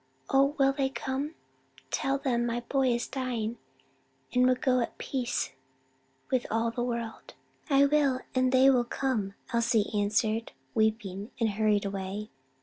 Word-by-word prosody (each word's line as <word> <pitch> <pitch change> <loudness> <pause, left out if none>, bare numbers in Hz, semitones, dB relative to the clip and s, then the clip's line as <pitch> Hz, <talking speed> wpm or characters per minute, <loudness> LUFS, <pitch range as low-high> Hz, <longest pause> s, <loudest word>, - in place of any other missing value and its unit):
Oh, 275 +2 +4
will 275 -1 +4
they 270 -1 0
come? 270 +4 -3 0.6
Tell 270 0 +1
them 250 -4 0
my 240 +1 -1
boy 265 +2 +1
is 240 -1 +1
dying 240 -4 -3 0.7
and 250 0 +4
would 255 -1 +2
go 255 -1 +2
at 235 - -3
peace 245 -3 -2 0.8
with 255 -2 +1
all 225 +1 +1
the 240 - -3
world." 235 -2 -4 0.3
"I 280 0 +6
will; 280 -3 +2
and 255 0 +2
they 260 +1 +6
will 250 -2 +3
come," 235 -6 -2 0.2
Elsie 230 -2 +2
answered, 215 +2 0 0.2
weeping, 215 -2 0
and 225 -2 +2
hurried 210 -1 +2
away. 195 +2 -4
240 Hz, 145 wpm, -29 LUFS, 220-265 Hz, 0.8 s, I